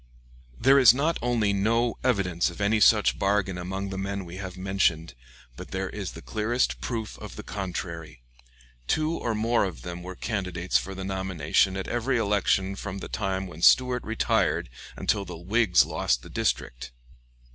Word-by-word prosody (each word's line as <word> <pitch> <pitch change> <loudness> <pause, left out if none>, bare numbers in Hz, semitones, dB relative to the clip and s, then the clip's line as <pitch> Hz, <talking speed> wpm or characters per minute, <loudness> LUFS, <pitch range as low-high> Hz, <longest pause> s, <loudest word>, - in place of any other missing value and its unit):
There 140 +1 +6
is 125 -3 +8
not 155 +5 0
only 115 -4 +1
no 115 +4 +1
evidence 90 -9 +1
of 85 - -11
any 105 +2 +2
such 105 0 +4
bargain 95 -2 0
among 95 +2 -4
the 95 0 -5
men 100 0 -3
we 85 +1 -9
have 95 -2 -7
mentioned, 95 -4 0 0.4
but - - -9
there - - -3
is - - -5
the - - -10
clearest 115 +3 -1
proof 115 -3 -4
of - - -9
the - - -8
contrary. 85 -8 -6 0.6
Two 155 0 +1
or 120 -9 -2
more 115 +2 +2
of 95 -5 -5
them 90 0 -6
were 90 +1 -8
candidates 90 -4 -3
for 95 +1 -7
the 95 0 -5
nomination 95 -1 0
at 95 - -4
every 120 +2 0
election 100 -2 +1
from 100 -1 -6
the 95 - -7
time 95 -2 -2
when 85 -3 -10
Stuart 125 +5 +5
retired 110 - 0 0.2
until 100 -2 0
the 90 - -8
Whigs 95 +1 +3
lost - - 0
the - - -12
district. - - -2
95 Hz, 170 wpm, -26 LUFS, 90-110 Hz, 0.6 s, is